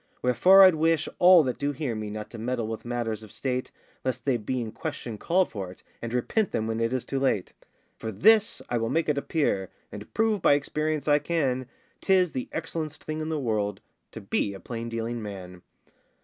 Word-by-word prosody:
Wherefore 180 +11 +7
I'd 185 -1 +8
wish 160 0 +1
all 180 -2 +8
that 125 -3 -3
do 145 0 -1
hear 140 -3 -3
me 110 -1 -4
Not 105 0 -6
to 115 - -8
meddle 120 0 -2
with 110 0 -5
matters 120 -3 -2
of 110 -2 -12
state, 130 -1 -2 0.3
Lest 130 -2 -3
they 135 -3 +2
be 120 +3 -2
in 115 -2 -4
question 110 -1 -6
called 180 +2 +2
for 95 -4 -5
it, 90 - -17 0.2
And 115 - -4
repent 170 - 0
them 110 - -1
when 110 0 -2
it 115 0 0
is 130 -1 -2
too 135 - -2
late. 130 -8 0 0.5
For 110 - -4
this 215 - +4
I 120 - 0
will 115 0 -1
make 165 -1 0
it 145 -1 +2
appear, 140 - 0 0.2
And 105 0 -9
prove 220 -3 +2
by - - +5
experience 150 +1 -1
I 145 0 +5
can, 140 -5 -1 0.3
'Tis 185 -3 +3
the 130 - -4
excellen'st 160 -2 -4
thing 155 0 -4
in 155 - -3
the 160 - -1
world 105 -5 -1 0.3
To - - -7
be 100 - -1
a - - -9
plain 115 +1 -6
dealing 115 0 -3
man. 95 -4 -8
125 Hz, 210 wpm, -27 LUFS, 115-155 Hz, 0.5 s, I'd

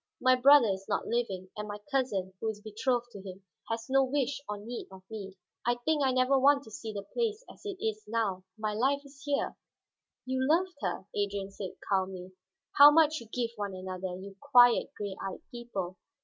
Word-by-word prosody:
"My 255 0 +5
brother 265 -2 +7
is 195 0 -3
not - - 0
living, 195 -6 -2
and 210 0 -5
my 205 0 -5
cousin, 210 -9 0
who 225 - -3
was 215 -1 -3
betrothed 240 +3 -1
to 200 - -9
him, 190 0 -10 0.3
has 225 0 -2
no 270 0 +4
wish 275 +1 -1
or 210 - -2
need 230 +4 -7
of 190 -1 -12
me. 195 -3 -7 0.3
I 240 +2 +2
think 295 +5 0
I 265 - +3
never 255 +1 +3
want 280 +1 +5
to 220 - -14
see 220 +1 -6
the 200 -1 -5
place 445 - -2
as - - -15
it 395 -2 -4
is 215 -1 -2
now. 210 -4 -1
My 215 -1 -2
life 275 +6 +1
is 275 0 -15
here." 285 -1 0 0.7
"You 260 0 -1
loved 345 +7 +2
her," - - -2
Adrian 200 -1 -2
said 195 -2 -6
calmly. 190 -2 -1 0.5
"How 285 +1 +11
much 310 0 +4
you 235 - -12
give 235 +1 -2
one 200 -2 -3
another, 185 0 -5
you 195 0 -10
quiet, 245 -2 +5
gray 200 -2 -4
eyed 195 - -5
people! 200 -7 -5
225 Hz, 200 wpm, -30 LUFS, 195-270 Hz, 0.7 s, How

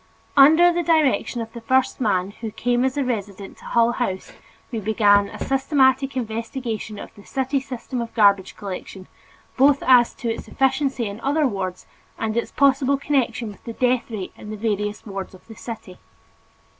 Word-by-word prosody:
Under 320 +5 +7
the 345 - 0
direction 310 -7 +1
of 225 0 -7
the 235 - -8
first 260 +3 +1
man 195 -4 +1
who 225 - -3
came 245 +3 0
as 265 +1 0
a 285 - +1
resident 205 -5 -5
to - - -16
Hull 235 0 +3
House 215 -6 -3 0.4
we 230 - -2
began 205 -1 +3
a - - -9
systematic 270 0 +2
investigation 225 -1 -4
of - - -9
the 205 - -16
city 265 +3 -1
system 255 -1 -5
of 230 - -5
garbage 200 -4 +3
collection, 190 -1 -7 0.5
both 275 +1 +4
as 245 -2 +5
to 230 -2 -2
its - - -9
efficiency 270 -2 0
in 200 +1 -6
other 290 +4 +1
wards 190 -6 -3 0.3
and 220 -1 -2
its 235 - -1
possible 275 0 +3
connection 250 -5 -1
with 205 - -13
the 230 - -6
death 250 +1 0
rate 210 -5 -6
in 210 - -11
the 215 - -5
various 210 -1 -2
wards 195 -2 -6
of 185 - -19
the 225 - -12
city. 215 -6 -9
235 Hz, 180 wpm, -22 LUFS, 210-265 Hz, 0.5 s, Under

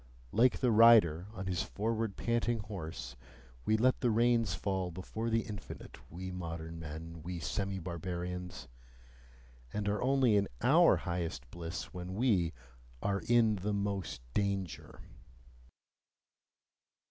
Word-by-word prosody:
Like 120 +3 +3
the 125 -3 +3
rider 105 -7 +6
on 95 -3 -6
his 90 -1 0
forward 110 -1 -2
panting 120 0 +1
horse, 80 - -6 0.5
we 110 - +3
let 130 +3 +3
the 125 - +2
reins 115 -1 +3
fall 95 -2 -1
before 100 +6 -4
the 115 0 +2
infinite, 105 -2 -8
we 95 +3 -6
modern 85 -2 -5
men, 80 +1 -7
we 90 +2 -5
semi 95 +5 -2
barbarians 90 0 -5 1.0
and 105 -1 -2
are 105 0 0
only 130 -3 +4
in 100 -1 +2 0.2
OUR - - +6
highest 85 -8 -3
bliss 85 +3 -6
when 90 0 -6
we 100 -8 +2 0.5
ARE 100 0 0
IN 115 -4 +4
MOST 100 -8 -2
DANGER. 100 -4 -2
95 Hz, 125 wpm, -33 LUFS, 85-110 Hz, 1.0 s, rider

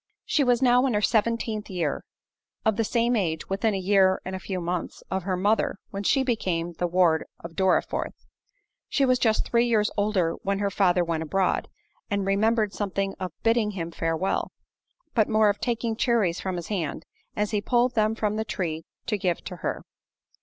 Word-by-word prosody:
She 295 - +2
was 245 0 +2
now 250 +1 +5
in 245 - 0
her 210 - +2
seventeenth 225 -1 0
year—of 180 +5 -4
the 225 - +1
same 235 +2 +1
age, 165 -7 -1
within 200 +2 +1
a - - -1
year 190 0 +3
and 190 +1 -4
a - - -4
few 185 -1 -4
months, 175 0 -4
of 190 - 0
her 185 -2 0
mother, 205 +4 +1 0.2
when 195 - -4
she 265 +7 +2
became 180 -9 -1
the 175 +2 -1
ward 170 -2 +3 0.2
of 170 -1 -8
Dorriforth. 190 -1 +1 0.7
She 275 - +2
was 255 -1 +3
just 220 -2 +2
three 235 0 +3
years 215 -3 +2
old 205 0 +1 0.2
when 200 0 -1
her 200 0 -1
father 180 -2 +3
went 165 -2 -2
abroad, 185 +4 0 0.4
and 200 -1 0
remembered 210 +1 +2
something 195 -1 -2
of 185 -1 -3
bidding 225 -2 +2
him 165 -1 -3
farewell; 165 +3 -1 0.6
but 220 -3 +3
more 215 -1 +4
of 205 - -1
taking 230 -1 -1
cherries 220 -8 +1
from 190 -1 -3
his 175 -2 -6
hand, 180 -8 -3 0.3
as 210 +1 -1
he 210 -2 0
pulled 245 +3 +2
them 215 -1 +2
from 215 -1 -1
the 220 - 0
tree 165 -7 -3 0.2
to 210 -3 -1
give 180 -2 -1
to 180 - -7
her. 185 - -3
200 Hz, 190 wpm, -26 LUFS, 185-225 Hz, 0.7 s, now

